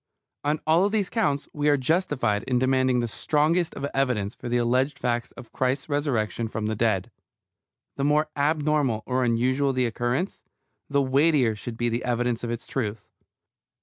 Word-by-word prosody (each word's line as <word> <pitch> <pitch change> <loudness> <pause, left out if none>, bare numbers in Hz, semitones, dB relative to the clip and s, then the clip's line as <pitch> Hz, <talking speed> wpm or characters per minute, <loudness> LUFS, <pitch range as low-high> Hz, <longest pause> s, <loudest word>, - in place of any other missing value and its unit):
On 150 +1 0
all 170 +6 +4
these 205 -3 0
counts 145 -10 0
we 150 0 +1
are 145 - +4
justified 130 - +1
in 125 -2 +1
demanding 130 -1 +2
the 120 - -1
strongest 155 +8 +1
of 140 - -3
evidence 125 -7 0
for 120 - -7
the 120 - +1
alleged 125 +4 +1
fact 120 -1 -1
of 120 -1 -11
Christ's 130 +3 -1
resurrection 125 -6 -1
from 110 0 -4
the 110 +1 -1
dead. 110 -1 0 0.9
The 140 - -1
more 150 +2 +3
abnormal 145 -5 +1
or 130 0 0
unusual 130 +4 +1
the 130 -1 +1
occurrence, 120 - -2 0.5
the 140 -1 +2
weightier 135 -3 +3
should 115 +2 -7
be 120 - 0
the 120 +1 -1
evidence 120 -1 -1
of 120 - -3
its 120 0 -4
truth. 110 -5 -4
130 Hz, 170 wpm, -25 LUFS, 120-145 Hz, 0.9 s, all